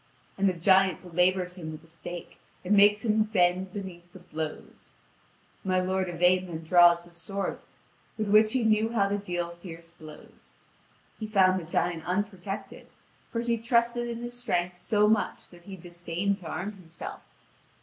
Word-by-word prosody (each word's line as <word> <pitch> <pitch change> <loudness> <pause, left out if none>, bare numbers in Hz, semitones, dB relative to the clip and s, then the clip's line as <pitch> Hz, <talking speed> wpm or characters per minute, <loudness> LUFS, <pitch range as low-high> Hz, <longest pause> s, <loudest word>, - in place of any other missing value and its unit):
And 200 0 +2
the - - -1
giant 190 +1 +3
belabours 180 +1 +1
him 160 -2 -6
with 155 0 -9
the - - -19
stake, 170 +1 -8 0.3
and 205 +3 +3
makes 205 +2 +5
him 220 -1 +3
bend 185 -3 +1
beneath 180 -3 -8
the - - -10
blows. 155 0 -7 0.7
My 185 -1 +1
lord 185 0 -1
Yvain 180 +2 +2
then 165 -2 -6
draws 175 +1 +5
the 175 - -17
sword 195 +4 -4 0.6
with 215 -1 -1
which 215 +1 +5
he 255 -3 +1
knew 220 0 +3
how 215 -4 +2
to 205 0 -1
deal 175 -3 -3
fierce 170 -1 -11
blows. 155 -2 -13 0.6
He 215 - -4
found 190 -3 +4
the 170 -1 -11
giant 170 -2 0
unprotected, 195 +1 -4 0.4
for 230 - -2
he 235 -1 0
trusted 235 +1 +1
in 235 0 -5
his 240 0 -5
strength 180 -8 -1
so 210 +3 +2
much 215 -1 0
that 175 -1 -16
he 195 - -8
disdained 175 +2 -3
to 175 - -9
arm 195 +6 -3
himself. 170 -3 -9
185 Hz, 170 wpm, -28 LUFS, 175-210 Hz, 0.7 s, makes